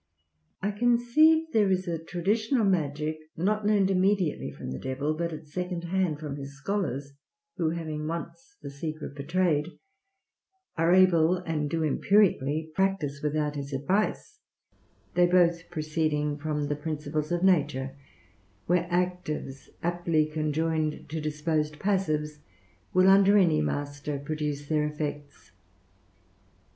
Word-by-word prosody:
I 205 - +1
conceive 245 +9 +3
there 210 -3 +4
is 185 0 0
a 165 -2 -3
traditional 215 +8 0
magic 155 -4 0 0.2
not 210 +5 0
learned 200 -2 +3
immediately 190 -3 +1
from 65 - -7
the 65 - -5
Devil, 135 +3 -2
but 170 +2 -2
at 155 - -8
second 180 +3 -4
hand 175 -3 0
from 145 -2 -5
his 140 0 -8
scholars, 140 -5 -3 0.4
who, 165 -3 +1
having 155 -2 -4
once 260 +11 -6
the 140 - -6
secret 155 +1 -6
betrayed, 155 +2 0 1.0
are 165 +1 +2
able, 180 -2 +5
and 160 -5 -2
do 165 +1 -1
empirically 160 -3 +2
practice 175 -7 0
without 150 0 -1
his 140 0 -5
advice, 195 - -1 0.7
they 175 0 +4
both 175 -1 +3
proceeding 155 -2 -1
upon 150 0 -2
the 145 - -1
principles 150 0 -3
of 175 +1 0
nature; 140 -7 +2 0.7
where 175 0 +2
actives 175 -6 -2
aptly 170 -2 +1
conjoined 155 0 -1
to 160 +1 -3
disposed 150 0 -1
passives 155 -6 -1 0.5
will 185 +1 +4
under 195 +1 +6
any 165 -6 +4
master 145 0 -3
produce 145 0 -4
their 150 -1 +1
effects. 145 -1 -6
160 Hz, 130 wpm, -28 LUFS, 150-185 Hz, 1.0 s, under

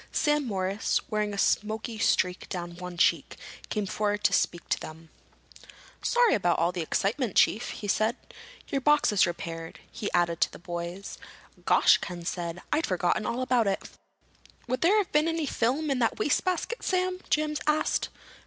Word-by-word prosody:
Sam 295 -2 +1
Morris, 195 0 0
wearing 210 -1 0
a 200 - -5
smoky 220 +2 0
streak 180 -3 +1
down 175 -1 -5
one 180 -1 -7
cheek, - - +2 0.3
came 210 -2 -1
forward 205 +1 -1
to - - +3
speak 170 0 0
to - - +1
them. 160 0 -10 0.9
"Sorry 485 -1 +3
about 175 -4 +2
all 170 +2 +2
the 180 -1 -3
excitement, 205 - -1
Chief," 230 +4 +3
he 210 - -6
said. 215 +3 +1 0.5
"Your 275 - -1
box 295 -1 +4
is 200 -3 +4
repaired," 165 -1 -6
he 205 - -4
added 170 -1 +1
to - - +3
the - - -10
boys. 175 +2 -6 0.5
"Gosh!" - - +5
Ken 175 -2 -7
said. 175 0 -4
"I'd 315 +2 +1
forgotten 185 +2 0
all 250 +2 -1
about 245 -4 +2
it." 195 - -2 0.8
"Would 255 +1 -2
there 380 +6 +4
have 410 -3 0
been 300 +2 +3
any 325 -1 -1
film 275 +4 0
in 265 - 0
that 230 -2 +1
wastebasket, 365 +9 0
Sam?" 370 0 0
James 300 0 0
asked. 305 0 +1
210 Hz, 170 wpm, -28 LUFS, 180-290 Hz, 0.9 s, Gosh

